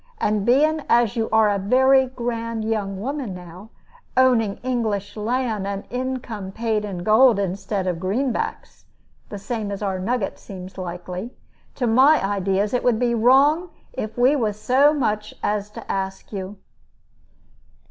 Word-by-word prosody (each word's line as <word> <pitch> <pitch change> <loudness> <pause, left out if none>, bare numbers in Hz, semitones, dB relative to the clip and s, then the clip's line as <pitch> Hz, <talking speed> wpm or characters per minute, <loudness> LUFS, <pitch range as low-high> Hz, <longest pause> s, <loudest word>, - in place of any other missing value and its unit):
And 210 0 0
being 305 +5 +3
as 235 -1 +3
you 225 -1 -1
are 220 -1 +5
a 200 -1 +1
very 260 +6 +4
grand 230 -3 -4
young 205 -3 -2
woman 255 -3 -4
now, 180 +4 -11 0.5
owning 240 -6 +3
English 215 -6 -2
land 220 -2 -1
and 200 0 -4
income 245 -6 -4
paid 220 0 -1
in 185 -4 -5
gold 220 +3 +5
instead 195 0 -2
of 180 -2 -2
greenbacks 225 +8 -3 0.4
the 205 - -6
same 210 +1 -4
as 200 +1 -5
our 190 -2 -1
nugget 215 +1 -2
seems 185 -1 -10
likely 180 +5 -6 0.4
to 250 - -1
my 260 +7 +5
ideas 200 +1 0
it 250 - 0
would 240 -3 +3
be 240 0 +1
wrong 275 +9 +4 0.2
if 215 +2 -5
we 255 +4 +4
was 215 -6 -1
so 275 +6 +4
much 215 -8 -2
as 210 0 -1
to 210 - -7
ask 190 +1 -4
you." 195 +1 -5
220 Hz, 150 wpm, -22 LUFS, 195-250 Hz, 0.5 s, are